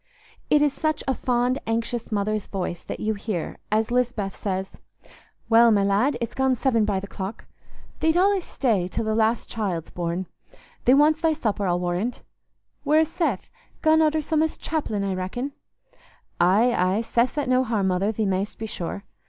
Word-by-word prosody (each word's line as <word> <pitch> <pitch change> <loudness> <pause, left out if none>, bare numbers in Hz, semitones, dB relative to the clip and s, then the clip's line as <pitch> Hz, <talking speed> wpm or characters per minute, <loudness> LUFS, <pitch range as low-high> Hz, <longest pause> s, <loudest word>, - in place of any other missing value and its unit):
It 295 0 +5
is 290 -2 +2
such 310 0 -1
a 265 - +2
fond 250 +1 0
anxious 230 +1 -2
mother's 210 0 -1
voice 180 -3 -4
that - - -6
you 220 0 0
hear, 200 -4 -4
as 220 +2 +1
Lisbeth 240 -5 0
says, 190 -1 -3 0.8
"Well, 230 +1 +6
my 205 -3 +3
lad, 215 +7 +2
it's 235 - -4
gone 265 -1 +2
seven 230 -3 +2
by 200 -2 0
th' 200 - -7
clock. 195 +2 -6 0.5
Thee't 320 0 +2
allays 385 +1 +3
stay 215 -9 0
till 220 +4 -3
the 220 - 0
last 220 +1 +1
child's 190 -8 -3
born. 175 +1 -3 0.6
Thee 255 - +6
wants 300 +2 +4
thy 325 -1 +3
supper, 215 -9 -1
I'll 175 0 +1
warrand. 180 +7 -2 0.6
Where's 310 +1 +3
Seth? 300 - -2 0.3
Gone 315 0 +5
arter 310 0 +2
some 310 +1 +1
o's 320 0 0
chapellin', 250 -11 -2
I 195 -1 -1
reckon?" 190 +9 -3 0.9
"Aye, 205 +8 +4
aye, 185 +4 +2
Seth's 240 +5 0
at 290 - 0
no 255 0 +3
harm, 215 -6 0
mother, 190 +3 +1
thee 220 0 -1
mayst 195 +1 -1
be 220 - -5
sure. 200 -2 -5
225 Hz, 175 wpm, -24 LUFS, 195-265 Hz, 0.9 s, Well